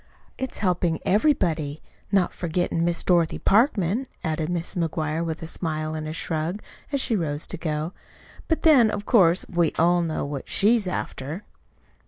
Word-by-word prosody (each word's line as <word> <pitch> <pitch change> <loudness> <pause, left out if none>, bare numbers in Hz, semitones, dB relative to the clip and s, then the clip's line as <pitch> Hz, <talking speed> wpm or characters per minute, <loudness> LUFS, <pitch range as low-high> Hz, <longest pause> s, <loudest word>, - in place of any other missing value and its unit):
"It's 260 -1 -5
helpin' 180 -4 +1
everybody 175 - +1 0.3
not 195 -3 +2
forgettin' 170 -1 -1
Miss 170 0 +1
Dorothy 170 -3 +2
Parkman," 215 - +2 0.2
added 160 -1 -1
Mrs. 175 +2 -3
McGuire, 155 +1 -2
with 160 -1 -4
a - - -3
smile 155 -2 -3
and 155 -1 -4
a - - -4
shrug, 165 +4 -3 0.3
as 280 - 0
she 235 - +1
rose 150 -5 -1
to - - -6
go. 155 +1 -3 0.5
"But, 320 - 0
then, 270 -9 +6
of 205 -1 -4
course, 185 -7 +4
we 170 -3 +1
all 175 +2 +4
know 160 -4 -2
what 140 -1 -6
she's 215 0 +3
after." 160 0 -4
170 Hz, 160 wpm, -24 LUFS, 160-200 Hz, 0.5 s, then